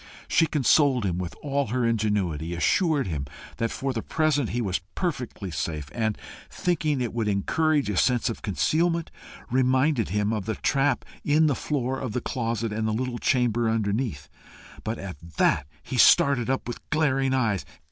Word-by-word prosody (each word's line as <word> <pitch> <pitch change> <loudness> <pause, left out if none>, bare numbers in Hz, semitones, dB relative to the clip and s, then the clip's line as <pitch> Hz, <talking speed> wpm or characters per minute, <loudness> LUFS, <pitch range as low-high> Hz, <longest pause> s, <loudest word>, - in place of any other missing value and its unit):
She 165 - +3
consoled 140 -4 +3
him 90 -2 -1
with 90 -2 -5
all 140 -2 0
her 120 +2 0
ingenuity, 100 -8 0
assured 155 - +2
him 75 -7 -3 0.3
that 115 - 0
for 135 +3 -3
the 115 - -2
present 150 -4 +1
he 120 - -2
was 95 -6 -1
perfectly 125 - -3
safe, 75 -2 -4
and, 110 -2 -1 0.3
thinking 155 -5 0
it 120 -3 -2
would 115 -2 -1
encourage 145 +8 +1
a 105 - -1
sense 125 +5 +2
of 115 - -3
concealment, 165 - 0 0.4
reminded 130 -1 +2
him 105 +3 0
of 105 -4 -2
the 110 0 -2
trap 135 -2 +1 0.2
in 155 +2 +3
the 150 - +3
floor 130 -1 -2
of 125 -5 -4
the 125 - 0
closet 115 -4 -2
and 110 +1 -1
the 110 - 0
little 120 +1 -2
chamber 120 -3 +2
underneath. 105 - -1 0.6
But 110 +2 -3
at 95 -6 -7 0.2
that 70 -2 +2 0.2
he 130 - -4
started 140 -4 +5
up 135 -2 -1
with 120 - -5
glaring 135 -4 +2
eyes. 110 -7 +1
120 Hz, 170 wpm, -26 LUFS, 105-140 Hz, 0.6 s, started